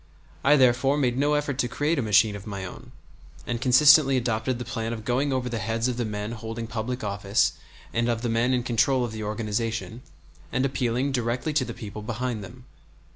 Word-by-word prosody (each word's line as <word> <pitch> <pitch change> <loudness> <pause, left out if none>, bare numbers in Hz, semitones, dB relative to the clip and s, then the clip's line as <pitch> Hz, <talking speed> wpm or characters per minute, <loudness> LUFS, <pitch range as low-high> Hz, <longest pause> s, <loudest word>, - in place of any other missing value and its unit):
I 145 - +6
therefore 130 +1 +3
made 125 -4 +1
no 145 +3 +2
effort 145 -3 -2
to 120 - +2
create 145 +5 0
a - - +2
machine 105 -1 +3
of 100 +1 -9
my 100 -2 -5
own, 90 - -10 0.5
and 120 -1 -3
consistently 135 +1 +6
adopted 120 0 -1
the 125 - -6
plan 115 0 -3
of 110 -1 -7
going 130 +4 +1
over 130 -1 -1
the 115 -2 -3
heads 115 +3 -1
of 125 -2 -2
the 120 - -1
men 105 0 -4
holding 115 0 -5
public 115 +2 -4
office 100 0 +1 0.4
and 115 +1 +1
of 115 0 -1
the - - 0
men 115 +2 +1
in 125 -2 +1
control 125 +2 +2
of 120 - -6
the 110 0 -6
organization, 110 +2 -3 0.5
and 130 +2 +1
appealing 130 0 0
directly 125 +4 -1
to 145 -3 +1
the - - -7
people 105 -3 -7
behind 120 0 -3
them. 125 +6 -12
120 Hz, 205 wpm, -25 LUFS, 110-130 Hz, 0.5 s, I